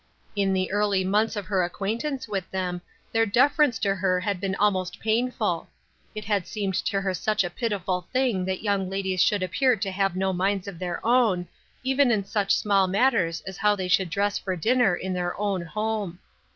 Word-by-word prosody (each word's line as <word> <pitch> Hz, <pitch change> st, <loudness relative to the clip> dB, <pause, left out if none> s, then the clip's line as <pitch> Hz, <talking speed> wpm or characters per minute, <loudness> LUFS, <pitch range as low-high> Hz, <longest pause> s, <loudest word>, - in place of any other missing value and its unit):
In 200 Hz, -1 st, +1 dB
the 185 Hz, 0 st, 0 dB
early 205 Hz, -2 st, +1 dB
months 210 Hz, +4 st, +1 dB
of 205 Hz, -2 st, -4 dB
her 185 Hz, 0 st, +1 dB
acquaintance 230 Hz, +10 st, -3 dB
with 195 Hz, -3 st, -3 dB
them 180 Hz, -2 st, -3 dB, 0.3 s
their 225 Hz, 0 st, +3 dB
deference 275 Hz, +4 st, +3 dB
to 200 Hz, -2 st, +1 dB
her 185 Hz, -1 st, +1 dB
had 185 Hz, -1 st, -2 dB
been 195 Hz, -1 st, -1 dB
almost 185 Hz, -4 st, 0 dB
painful; 220 Hz, -5 st, 0 dB, 0.5 s
it 215 Hz, -1 st, -5 dB
had 200 Hz, -4 st, 0 dB
seemed 200 Hz, -3 st, -2 dB
to 195 Hz, +2 st, 0 dB
her 190 Hz, -1 st, -1 dB
such 215 Hz, +4 st, 0 dB
a 175 Hz, -, -4 dB
pitiful 190 Hz, -4 st, -2 dB
thing 255 Hz, -8 st, +1 dB
that 190 Hz, +1 st, -3 dB
young 200 Hz, -3 st, 0 dB
ladies 190 Hz, -1 st, -1 dB
should 205 Hz, -3 st, +3 dB
appear 240 Hz, +8 st, +2 dB
to 195 Hz, -2 st, -3 dB
have 195 Hz, -1 st, 0 dB
no 190 Hz, 0 st, 0 dB
minds 195 Hz, +1 st, 0 dB
of 185 Hz, -4 st, -7 dB
their 180 Hz, +1 st, -4 dB
own, 225 Hz, -7 st, +3 dB, 0.4 s
even 265 Hz, 0 st, +3 dB
in 210 Hz, -4 st, +1 dB
such 200 Hz, 0 st, +1 dB
small 195 Hz, -2 st, +2 dB
matters 190 Hz, -5 st, +2 dB
as 190 Hz, -1 st, -8 dB
how 210 Hz, 0 st, +3 dB
they 190 Hz, -2 st, -3 dB
should 185 Hz, 0 st, +2 dB
dress 200 Hz, +4 st, 0 dB
for 190 Hz, -2 st, -3 dB
dinner 220 Hz, +1 st, +3 dB
in 185 Hz, +1 st, -4 dB
their 180 Hz, 0 st, -3 dB
own 200 Hz, -3 st, 0 dB
home. 210 Hz, 0 st, -3 dB
195 Hz, 195 wpm, -25 LUFS, 185-215 Hz, 0.5 s, their